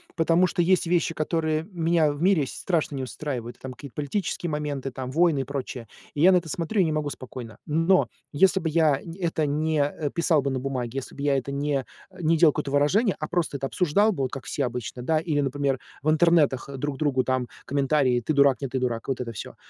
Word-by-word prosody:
потому 165 +2 +3
что 180 0 0
есть 180 0 +3
вещи, 170 -1 +1
которые 155 0 -1
меня 165 -3 +2
в 145 +2 -7
мире 180 -6 +3
с - - -7
страшно 160 -5 -1
не 130 - -3
устраивают, 125 -3 -5
там 130 - -7
какие-то 130 -1 -11
политические 170 +3 -2
моменты, 145 -3 -3
там, 130 0 -6
войны 160 0 +3
и - - 0
прочее. 130 -4 -5 0.3
И 145 - -3
я 185 - +7
на - - +6
это 165 -2 -3
смотрю 175 +7 0
и - - +5
не 160 - 0
могу 155 -1 -1
спокойно. 125 -5 -8
Но 165 +5 +3 0.3
если 190 +5 +4
бы 165 - -2
я 155 -3 +3 0.2
это 165 -3 0
не, 155 +2 0
э, 145 +1 -1
писал 165 -3 +2
бы 140 0 -1
на 130 - -1
бумаге, 125 -3 -3
если - - -10
бы 140 - -8
я 140 -1 +3
это 135 +1 -4
не, 140 -1 -1 0.3
э, 185 - -17
не 165 +1 +3
делал 155 -1 +6
какое-то 140 - -3
выражение, 180 +10 +3
а 155 - -3
просто 175 -4 -1
это 135 0 -3
обсуждал 195 +8 +2
бы, 135 -8 -1
как 135 -1 -7
все 140 +4 -1
обычно, 125 0 -5
да, 155 +6 +1
или, 155 -2 -1
например, 140 -1 -1 0.2
в 155 - +2
интернетах 155 -5 +3
друг 140 0 -3
другу 135 -4 +1
там 130 -2 -1 0.2
комментарии: 140 -2 +2
"Ты 155 +6 -2
дурак, 140 -2 +4
нет 135 - -4
ты 130 - -1
дурак". 120 -3 -2
Вот 130 -2 -2
это 115 - -4
всё, 110 - -8
145 Hz, 230 wpm, -25 LUFS, 135-165 Hz, 0.3 s, я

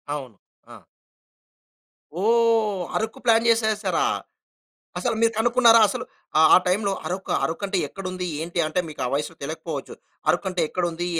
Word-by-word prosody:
అవును. 130 -7 -8 0.4
ఆ! - - -16 1.4
ఓహ్! 225 -3 +2 0.2
అరకు 220 0 -4
ప్లాన్ 230 0 +4
చేసేసారా? 220 - +1 0.9
అసలు 245 -3 -1
మీరు 230 0 +3
కనుక్కున్నారా? 235 0 +5
అసలు, 250 +4 -4 0.5
ఆ - - +9
టైమ్‌లో 200 +2 +1
అరకూ? 185 +1 -3
అరుకు 165 +5 -3
అంటే 195 -1 -1
ఎక్కడ 195 +6 -10
ఉంది! 185 0 -4 0.2
ఏంటి! 170 +1 -5
అంటే, 155 +4 0
మీకు 150 - -10
ఆ - - -1
వయస్సు 150 +3 -3
తెలియకపోవచ్చు. 155 +3 -6 0.3
అరకు - - +2
అంటే 180 -1 -2
ఎక్కడ 180 - -2
ఉంది? 175 +1 -4
200 Hz, 145 wpm, -23 LUFS, 175-230 Hz, 1.4 s, ఆ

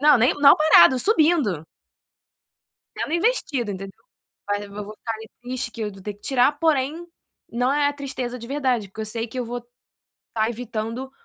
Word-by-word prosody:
Não, 295 -3 +6
nem 250 +4 +3
não 285 -1 +7
parado, 260 - +6
subindo. 305 - +2 1.3
Sendo 310 - -3
investido, 310 - 0
enten 195 +1 -6 0.6
mas 205 0 -1
eu 200 - -10
v 210 +1 -6
vou 210 +1 -10
ficar 225 +1 -5
ali 220 0 -9
triste 245 -1 -4
que 230 - -8
eu 210 -1 -2
vou 195 0 -13
ter 210 - -4
que 205 - -25
tirar, 265 +1 +3
porém, 315 +2 0 0.4
não 245 +3 +1
é 290 -1 +2
a 290 - -1
tristeza 260 -3 -5
de 235 - -9
verdade. 255 -7 0
Porque 215 +3 -8
eu - - -3
sei 230 +2 -4
que 255 - -6
eu 245 - -2
vou 240 +1 -4 0.7
estar 220 0 0
evitando 235 +2 -5
245 Hz, 190 wpm, -23 LUFS, 220-280 Hz, 1.3 s, não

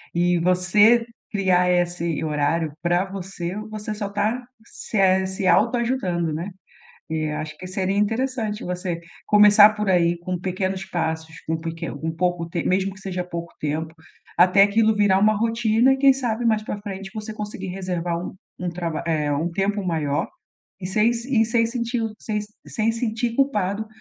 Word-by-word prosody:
E 175 0 +2
você 195 +7 +4 0.3
criar 185 -3 +2
esse 175 -2 0
horário 150 +1 0
para 175 +2 +1
você, 190 -2 -6
você 215 0 -5
só 205 -1 -4
está 215 +5 -1 0.2
se 220 - -6
é 190 -1 +4
se 190 0 -2
autoajudando, 230 -9 +1
né? 170 +6 -4 0.6
E 155 -1 -1
acho 155 0 -5
que 185 - -9
seria 190 +1 -1
interessante 225 0 -1
você 180 -1 -3 0.3
começar 210 0 +7
por 210 -1 -2
aí 175 -2 +3
com 180 +1 -4
pequenos 190 +1 -2
passos, 160 -3 -3
com 160 0 0
peque 165 0 -5
com 160 +3 -4
pouco 175 0 -1
t 170 -1 -2
mesmo 190 +1 +1
que 205 - -14
seja 185 -2 -4
pouco 170 -1 -7
tempo 155 +2 -3 0.4
até 185 +3 +6
aquilo 215 +2 +4
virar 205 -2 +3
uma 215 +2 +4
rotina 230 +3 +3
e - - +2
quem 270 0 +6
sabe, 240 -3 -2
mais 220 -2 +2
para 210 - -4
frente, 195 -1 -7
você 215 0 -5
conseguir 205 -3 -6
reservar 180 -2 -3
um 180 - -6 0.3
um 180 - -2
trab 170 -3 -3
eh, 150 -3 0
um 160 +5 -1
tempo 200 +3 -1
maior 150 -4 -1 0.5
e 180 - -4
sem 215 +5 +2
se 235 0 0
e - - +3
sem 230 0 +2
sentir 235 0 -2
o 225 -1 -2
sem 210 -1 -2 0.3
sem 225 +1 0
sentir 230 0 -2
culpado 215 -6 0
190 Hz, 170 wpm, -23 LUFS, 175-215 Hz, 0.6 s, começar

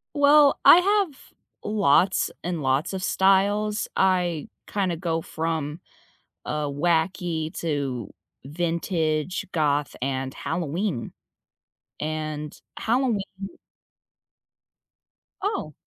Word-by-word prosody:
Well, 285 0 +6
I 345 - +10
have 390 -6 +2 0.5
lots 195 -3 +3
and 175 -3 -3
lots 135 +5 +1
of 190 -1 -4
styles. 205 +3 +2
I 180 -4 +1 0.2
kinda 190 -4 -1
go 165 -1 -1
from, 160 -1 -3 0.6
uh, 150 0 -2
wacky 160 +2 0
to 140 - -2 0.3
vintage, 165 +1 -1
goth, 145 -2 +1
and 130 0 -2
Halloween. 165 - -3 0.9
And 155 -1 -4 0.2
Halloween 235 -3 +1 2.2
Oh. 390 - -2
170 Hz, 85 wpm, -25 LUFS, 150-195 Hz, 2.2 s, I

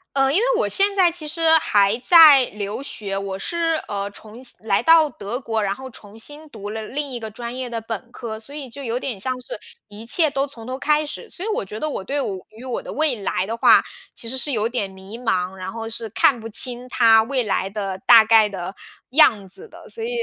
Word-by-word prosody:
嗯， 270 0 +3
因 - - +5
为 - - +2
我 - - +1
现 400 0 +2
在 360 -3 +4
其 315 -3 -5
实 325 +1 +1
还 205 +1 +2
在 295 -2 +8
留 205 +5 -5
学， 200 -7 -3
我 195 -1 -4
是 330 - -1
呃， 200 0 -4
重 215 +4 -13
新 255 - -7
来 195 -2 +2
到 325 -2 +6
德 210 -1 -6
国， 225 -4 -2
然 195 0 -1
后 265 +3 -9
重 210 -2 -13
新 295 +6 -4
读 205 -5 -8
了 220 0 -5
另 285 0 -4
一 240 - -5
个 220 - -6
专 235 +3 -7
业 255 -1 -4
的 230 - -3
本 225 +1 -7
科， 220 -3 -7
所 255 +6 -9
以 290 -3 -7
就 280 +3 -8
有 240 0 -2
点 245 -7 -5
像 255 +3 -2
是 250 - -8 0.3
一 210 +2 -11
切 315 +5 +4
都 275 0 -1
从 230 -5 -12
头 255 +1 -4
开 300 +1 +1
始。 460 - -8
所 370 - -7
以 - - -2
我 420 - -1
觉 210 +2 -8
得 310 - -2
我 280 - -4
对 280 +8 -2
我 200 -7 -3
于 220 +3 -13
我 255 -2 -4
的 - - -8
未 305 -4 +1
来 195 -2 -2
的 225 - -3
话， - - +6 0.3
其 - - -7
实 260 - -1
是 290 - -1
有 220 -3 0
点 235 -5 -3
迷 190 +4 -11
茫， 185 -6 -1
然 185 0 -6
后 225 0 -6
是 225 0 -3
看 235 +3 +2
不 225 - -7
清 245 +3 +2
它 225 -3 +5
未 255 -1 -1
来 195 -1 -1
的 195 -2 -4
大 230 -2 +8
概 220 -1 +5
的 190 -1 -6 0.4
样 230 -9 +4
子 445 - -7
的。 - - -14
所 455 - -6
以 460 - -3
235 Hz, 265 characters per minute, -21 LUFS, 210-280 Hz, 0.4 s, 在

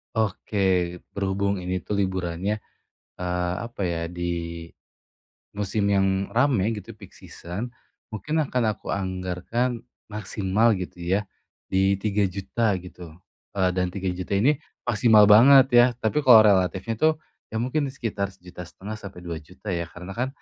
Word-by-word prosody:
Oke. 110 -1 -2 0.5
Berhubung 100 0 -1
ini 90 0 -3
tuh 105 - -3
liburannya, 95 +1 -1 0.6
eee, 90 0 -2
apa 120 -3 -10
ya, 85 -1 -2
di 85 -1 -4 0.9
musim 100 0 0
yang 95 -1 +1
rame 115 -5 +2
gitu, 105 +3 -9
peak 105 -3 -15
season. 100 +9 -7 0.4
Mungkin 150 +9 -3
akan 125 -2 -1
aku - - -20
anggarkan 95 +6 -2 0.3
maksimal 105 +1 +1
gitu 90 -1 -7
ya, 95 +4 +1 0.5
di 95 +1 +3
Rp3.000.000 100 +1 0
gitu, 90 -3 -11 0.4
eee, 95 -1 +2
dan 90 0 +1
Rp3.000.000 95 0 -3
ini 130 +9 +4 0.4
maksimal 110 -2 +6
banget 130 +5 +8
ya, 120 0 +8
tapi 110 +7 +1
kalau 120 -4 +9
relatifnya 95 +2 +2
tuh, 155 +6 +4 0.4
ya - - -3
mungkin 140 +3 0
sekitar 105 -6 -3
Rp1.500.000 90 +4 -9
sampai 100 -4 -10
Rp2.000.000 85 +5 -8
ya, 85 -1 -1
karena 90 +3 -9
kan, 125 +2 0
100 Hz, 130 wpm, -25 LUFS, 90-110 Hz, 0.9 s, kalau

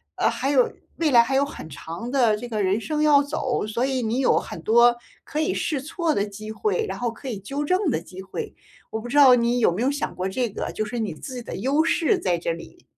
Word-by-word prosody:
呃， - - +2
还 270 - -2
有 265 -3 +4 0.3
未 325 -2 +2
来 235 -2 +7
还 235 - -3
有 275 +1 +3
很 280 - -9
长 165 - -7
的 240 -6 +3
这 240 +3 -7
个 215 -2 -1
人 195 +3 +1
生 300 +4 -2
要 295 -2 +5
走， 280 -6 -2
所 225 +4 -1
以 265 -1 -1
你 230 +2 -1
有 270 - +3
很 165 - -8
多 235 +5 +5 0.3
可 300 - -4
以 345 +4 +1
试 295 -5 -1
错 320 +2 -1
的 200 - 0
机 210 +1 -8
会， 430 - -1
然 - - -5
后 240 - 0
可 245 +4 -8
以 215 -5 -4
纠 275 +9 -4
正 365 +4 +1
的 165 - 0
机 185 +2 -10
会， 190 0 -6 0.4
我 220 - -3
不 230 - -7
知 245 - -4
道 275 -4 +8
你 240 0 +1
有 225 - +4
没 180 +6 -3
有 255 - +2
想 285 +1 -2
过 185 - -3
这 235 +5 -1
个？ 205 - -4
就 215 - -2
是 235 +3 -4
你 210 -6 -2
自 255 - -8
己 245 - -5
的 - - -7
优 270 +9 +1
势 335 +4 +2
在 180 - 0
这 170 0 -2
里。 170 - -9
245 Hz, 280 characters per minute, -24 LUFS, 215-285 Hz, 0.4 s, 道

